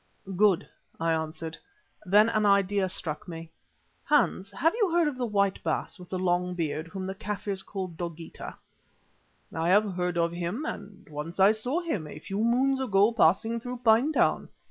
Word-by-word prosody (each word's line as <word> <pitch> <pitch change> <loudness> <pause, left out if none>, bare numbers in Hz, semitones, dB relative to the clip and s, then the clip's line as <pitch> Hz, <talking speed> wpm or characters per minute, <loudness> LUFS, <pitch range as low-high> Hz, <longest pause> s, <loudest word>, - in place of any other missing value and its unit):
"Good," 195 -2 +3 0.3
I 165 0 +1
answered. 160 0 -4 0.5
Then 210 +4 +6
an 215 -2 +1
idea 200 -1 +3
struck 160 -2 -5
me. 165 -1 -8 0.5
"Hans, 205 -9 +1
you - - -15
have 325 +5 +3 0.2
heard 340 -1 +3
of 295 - -2
the 250 -1 -2
white 200 -2 +1
Baas - - -2
with 180 - -12
the 185 - -2
long 180 0 0
beard 160 -1 -2
whom 190 +2 -6
the 190 - -3
Kaffirs 200 -1 -4
call 190 -1 -5
Dogeetah?" 170 -1 -7 1.0
"I 165 +1 0
have 205 +1 +4
heard 180 -1 -1
of 170 0 +2
him 175 - -3
and 200 -7 -7
once 155 +4 -7
I 195 +2 +7
saw 245 +10 -1
him, 220 - -3
a 150 - -9
few 195 +7 -3
moons 265 +3 +2
ago 205 -3 +3
passing 225 +2 +2
through 245 +1 -7
Pinetown. 240 +7 +3
195 Hz, 170 wpm, -28 LUFS, 170-220 Hz, 1.0 s, I